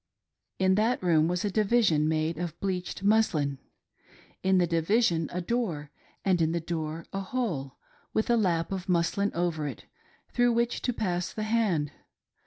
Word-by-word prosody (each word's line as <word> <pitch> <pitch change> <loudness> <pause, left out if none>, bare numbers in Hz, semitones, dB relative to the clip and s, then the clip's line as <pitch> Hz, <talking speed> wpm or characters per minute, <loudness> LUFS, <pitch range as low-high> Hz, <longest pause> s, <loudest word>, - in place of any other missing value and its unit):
In 190 0 +3
that 230 -1 +1
room 160 -3 +4
was 180 +3 -1
a 205 - 0
division 200 -8 +3
made 160 0 0
of 170 -1 -4
bleached 185 -2 -3
muslin; 160 -10 +2 0.8
in 190 0 +3
the 180 - +4
division 165 0 +2
a 180 - -2
door 170 -9 -2 0.3
and 185 -3 +3
in 160 0 +2
the 170 - 0
door 160 -1 -4
a 195 - -1
hole, 185 - -3 0.3
with 220 - 0
a 240 - +4
lap 175 -7 +1
of 190 -1 -4
muslin 180 +3 +1
over 165 -3 -1
it, 130 - -7 0.5
through 245 -1 +3
which 235 +1 0
to 250 - 0
pass 180 -6 -2
the 215 - -4
hand. 210 -10 +1
180 Hz, 165 wpm, -28 LUFS, 160-215 Hz, 0.8 s, room